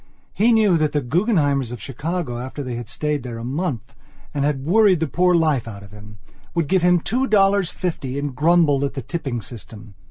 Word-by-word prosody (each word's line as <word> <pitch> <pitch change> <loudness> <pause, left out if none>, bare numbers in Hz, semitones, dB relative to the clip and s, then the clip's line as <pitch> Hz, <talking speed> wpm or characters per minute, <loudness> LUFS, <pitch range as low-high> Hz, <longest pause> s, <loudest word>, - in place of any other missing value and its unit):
He 230 +4 +3
knew 210 -7 +4
that 155 -1 0
the 145 - +1
Guggenheimers 145 - +1
of 125 - -6
Chicago, 135 - -4
after 130 +3 -6
they 125 -2 -5
had 120 -2 -6
stayed 150 -2 -2
there 120 -2 -7
a 115 - -7
month 135 - -3 0.4
and 140 - -1
had 140 -2 -1
worried 195 0 +4
the 160 - +1
poor 180 +4 +2
life 155 -8 +1
out 100 -2 -8
of 100 - -14
him, 105 0 -13 0.4
would 165 -3 0
give 185 +2 +2
him 180 0 +4
two 255 +10 -1
dollars 200 -4 +3
fifty 140 -7 -4
and 140 -2 -3
grumble 155 -2 +3
at 140 - -2
the 135 - -4
tipping 135 -9 -4
system. 110 -1 -11
145 Hz, 210 wpm, -21 LUFS, 125-175 Hz, 0.4 s, knew